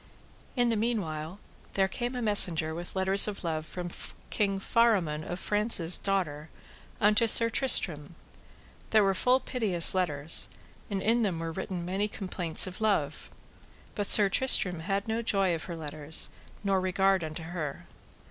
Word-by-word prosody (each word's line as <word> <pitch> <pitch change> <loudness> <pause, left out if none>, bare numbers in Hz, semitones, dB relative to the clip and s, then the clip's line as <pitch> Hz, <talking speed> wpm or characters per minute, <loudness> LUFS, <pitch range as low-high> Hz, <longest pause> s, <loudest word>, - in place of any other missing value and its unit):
In 245 -2 0
the 230 - -1
meanwhile 190 -7 -4 0.4
there 195 -1 +1
came 240 +6 -6
a 245 - -5
messenger 175 -7 +5
with 175 +3 -9
letters 190 +2 +5
of 205 -2 -7
love 160 -2 -5
from 175 -1 -7 0.4
King 195 -2 -2
Faramon 195 -9 0
of 175 +3 -7
France's 205 -5 +2
daughter 160 -6 -3 0.5
unto 210 +2 +2
Sir 230 +1 +3
Tristram, 170 - +1 0.7
that 215 -1 +3
were 195 0 0
full 250 +6 +1
piteous 215 -10 +4
letters, 160 -4 -1 0.4
and 195 -2 -4
in 230 +2 0
them 195 -6 -2
were 165 0 -6
written 175 +1 -7
many 195 +3 -3
complaints 180 -5 +2
of 185 +2 -9
love; 155 -9 -2 0.6
but 205 -1 -4
Sir 205 -2 +8
Tristram 195 -5 +2
had 195 +4 -4
no 225 +1 -3
joy 195 -5 -1
of 165 - -6
her 170 - -8
letters 155 0 -5 0.3
nor 195 -2 -1
regard 190 0 0
unto 155 +1 -8
her. 160 -4 -7
190 Hz, 155 wpm, -27 LUFS, 165-210 Hz, 0.7 s, Sir